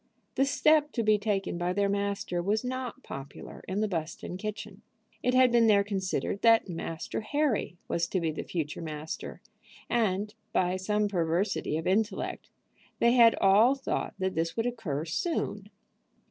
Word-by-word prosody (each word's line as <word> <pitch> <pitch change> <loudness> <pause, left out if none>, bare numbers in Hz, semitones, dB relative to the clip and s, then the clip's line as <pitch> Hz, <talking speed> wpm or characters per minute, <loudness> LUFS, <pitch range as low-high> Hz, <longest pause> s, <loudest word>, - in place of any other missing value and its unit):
The 270 - +2
step 300 +1 +3
to 230 - 0
be 215 -1 +4
taken 200 -4 -1
by 175 +1 0
their 200 +1 +1
master 200 -3 -1
was 210 +5 0
not 255 +1 -4
popular 135 +1 -9
in 190 +3 -1
the 215 - +1
Buston 170 -1 -4
kitchen. 210 0 -6 0.4
It 250 0 +1
had 255 -1 +6
been 235 -1 +5
there 200 -2 +5
considered 195 0 -2
that 230 -2 +5
Master 165 0 -4
Harry 260 - -1
was 170 0 0
to 185 - -1
be 165 -2 -1
the 155 - -5
future 160 -4 -4
master, 155 +2 -6 0.5
and, 210 -3 +1 0.2
by 180 0 +2
some 210 +3 0
perversity 175 -2 0
of 160 - -4
intellect, 205 +1 -1 0.5
they 235 - +4
had 235 -2 +6
all 210 +7 +5
thought 270 - -3
that 190 -1 -1
this 165 +3 -2
would 225 - 0
occur 190 - -3
soon. 205 - -2
200 Hz, 160 wpm, -29 LUFS, 175-230 Hz, 0.5 s, had